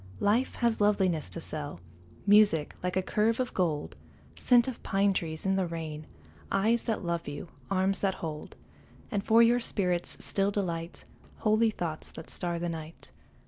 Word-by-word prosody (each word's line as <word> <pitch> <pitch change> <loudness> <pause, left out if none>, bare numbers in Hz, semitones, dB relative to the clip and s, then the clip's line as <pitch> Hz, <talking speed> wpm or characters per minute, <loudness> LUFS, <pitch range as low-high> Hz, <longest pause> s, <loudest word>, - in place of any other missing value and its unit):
Life 225 +6 +2
has 235 -3 +1
loveliness 190 -6 +2
to - - -6
sell, 150 - -5 0.5
Music 205 -7 +5
like 180 +1 -1
a 190 - +1
curve 220 +4 +1
of 255 -1 -1
gold, 150 - -1 0.4
Scent 240 -1 +4
of 260 - -5
pine 195 0 +2
trees 160 -2 -3
in 190 0 +2
the 185 -2 +1
rain, 155 -2 -6 0.4
Eyes 225 +4 +2
that 220 -5 -2
love 170 -1 -2
you, 145 +4 -6 0.2
arms 195 0 +1
that 195 -2 0
hold, 155 -2 -6 0.6
And 205 -3 -1
for 225 +2 +6
your 240 +1 +4
spirit's 180 -6 -1
still 195 0 +1
delight, 170 -4 -3 0.3
Holy 220 +1 +3
thoughts 170 -7 -4
that 160 - -7
star 175 -2 -2
the 175 +1 -2
night. 160 -1 -7
190 Hz, 165 wpm, -29 LUFS, 165-210 Hz, 0.6 s, for